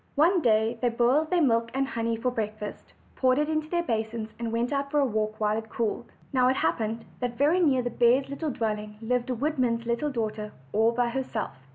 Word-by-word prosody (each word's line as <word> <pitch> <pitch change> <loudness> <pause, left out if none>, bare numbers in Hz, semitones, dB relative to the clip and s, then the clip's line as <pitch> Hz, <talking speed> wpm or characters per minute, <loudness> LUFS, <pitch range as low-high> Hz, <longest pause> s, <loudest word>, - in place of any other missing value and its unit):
One 340 +5 +4
day 225 -1 +2
they 245 - +3
boiled 245 +7 +2
their 355 -3 +3
milk 230 -3 +2
and 270 0 +1
honey 230 0 -1
for 250 +2 -1
break 215 -3 -2
fast, 210 -1 -8 0.2
poured 255 -1 +3
it 300 0 +1
into 310 0 -1
their 345 0 0
basins, 220 -4 -3
and 230 -1 -3
went 235 +4 0
out 280 0 -1
for 295 - +2
a 280 - +4
walk 215 -2 -2
while 210 0 +1
it 220 0 -10
cooled. 235 +1 -2 0.2
Now 255 -1 +4
it 260 - +3
happened 220 +6 -1
that 245 -1 -3
very 300 +6 +3
near 275 -7 +3
the 245 - -2
bears' 255 +4 +3
dwelling 215 -8 -3
lived 245 +2 -1
a 250 - 0
woodman's 250 -4 0
little 235 +6 0
daughter, 215 -4 -3 0.2
all 220 +2 +4
by 240 0 +1
herself. 245 -3 -3
235 Hz, 215 wpm, -27 LUFS, 225-275 Hz, 0.2 s, One